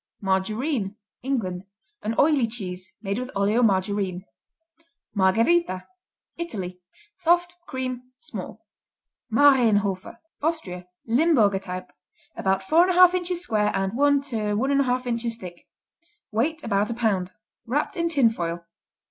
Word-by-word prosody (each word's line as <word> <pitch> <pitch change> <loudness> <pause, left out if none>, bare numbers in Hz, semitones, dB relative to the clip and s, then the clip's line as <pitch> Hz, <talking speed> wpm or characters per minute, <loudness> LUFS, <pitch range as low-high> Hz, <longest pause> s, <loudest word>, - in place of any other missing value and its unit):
Margarine 210 +3 -1 0.3
England 205 -9 -2 0.4
An 220 +2 -2
oily 285 -5 +4
cheese 190 -4 -7
made 200 +2 -2
with 255 0 -5
oleomargarine. 200 -3 +1 0.9
Margherita 210 - +2 0.5
Italy 185 - -5 0.3
Soft; 350 0 +2
cream; 255 -1 -5
small. - - -8 0.7
Marienhofer 220 -8 +3 0.2
Austria 190 - -3 0.2
Limburger 235 - +3
type. 185 -1 -7 0.4
About 190 0 0
4 330 - +4
1/2 365 -1 +6
inches 355 -1 0
square 210 -10 +1
and 195 +1 -1
1 285 +1 +4
1/2 250 +2 0
inches 235 -1 -1
thick; 180 -6 -11 0.6
weight 300 +9 0
about 205 -1 +1
a 235 - -3
pound. 195 -6 0 0.3
Wrapped 285 +6 -1
in 335 -1 0
tin 275 -8 +4
foil. 170 -4 -4
225 Hz, 110 wpm, -25 LUFS, 195-280 Hz, 0.9 s, 1/2